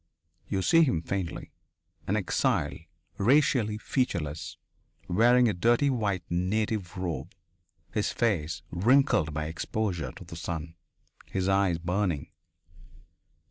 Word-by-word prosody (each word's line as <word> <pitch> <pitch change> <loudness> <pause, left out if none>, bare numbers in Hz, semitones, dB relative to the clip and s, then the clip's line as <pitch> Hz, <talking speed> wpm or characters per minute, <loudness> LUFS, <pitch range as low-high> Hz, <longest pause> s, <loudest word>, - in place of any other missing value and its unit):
You 95 -1 -1
see 165 - +5
him 90 - +2
faintly 95 -2 -4 0.6
an 100 - +1
exile, 100 -5 +1 0.5
racially 115 -2 +3
featureless, 80 - -2 0.5
wearing 120 +6 +5
a 105 - +1
dirty 120 +9 +3
white 105 -7 -1
native 95 +2 -1
robe, 90 -3 -4 0.6
his 105 - 0
face 85 -10 -1
wrinkled 95 - +3
by 75 +1 -3
exposure 90 +1 -2
to - - -11
the - - -10
sun, 80 -1 -5 0.5
his 95 -1 -1
eyes 95 -3 +2
burning. 90 -2 -1
95 Hz, 110 wpm, -28 LUFS, 85-110 Hz, 0.6 s, see